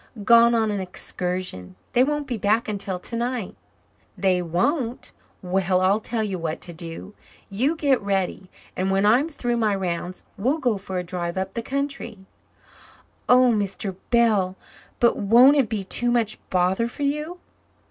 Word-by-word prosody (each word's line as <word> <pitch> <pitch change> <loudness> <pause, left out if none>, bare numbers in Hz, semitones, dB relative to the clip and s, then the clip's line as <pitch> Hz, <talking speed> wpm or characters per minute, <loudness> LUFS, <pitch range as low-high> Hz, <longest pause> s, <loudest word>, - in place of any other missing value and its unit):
"Gone 235 +2 +6
on 220 -2 +1
an 205 - -2
excursion. 180 - -4 0.2
They 250 0 +5
won't 295 +1 -1
be 255 -3 -3
back 215 +2 +1
until 200 -3 -3
tonight." 235 +2 -3 0.6
"They 185 -1 +2
won't? 230 - -1 0.3
Well, 185 0 +1
I'll 190 +3 +3
tell 225 0 -2
you 195 -4 -3
what 160 -1 -3
to 175 - -8
do. 165 +4 -7 0.4
You 260 +11 +1
get 280 -5 +2
ready, 195 -2 -2 0.3
and 185 +1 -1
when 195 +1 +2
I'm 250 +9 +4
through 245 -6 -2
my 215 -3 +1
rounds 180 -1 -4 0.2
we'll 260 +9 +1
go 245 -9 0
for 190 -1 -5
a 180 - -2
drive 175 0 -4
up 190 0 -3
the 230 - -3
country." 275 -3 -4 1.1
"Oh, 250 0 +6
Mr. 200 -2 -2
Bell! 215 -6 +3 0.4
But 235 - +3
won't 245 +8 +6
it 260 -6 +2
be 215 -3 -2
too 240 +5 0
much 230 -3 +1
bother 185 +5 +1
for 265 +4 -6
you?" 300 +5 -2
210 Hz, 160 wpm, -23 LUFS, 185-240 Hz, 1.1 s, Gone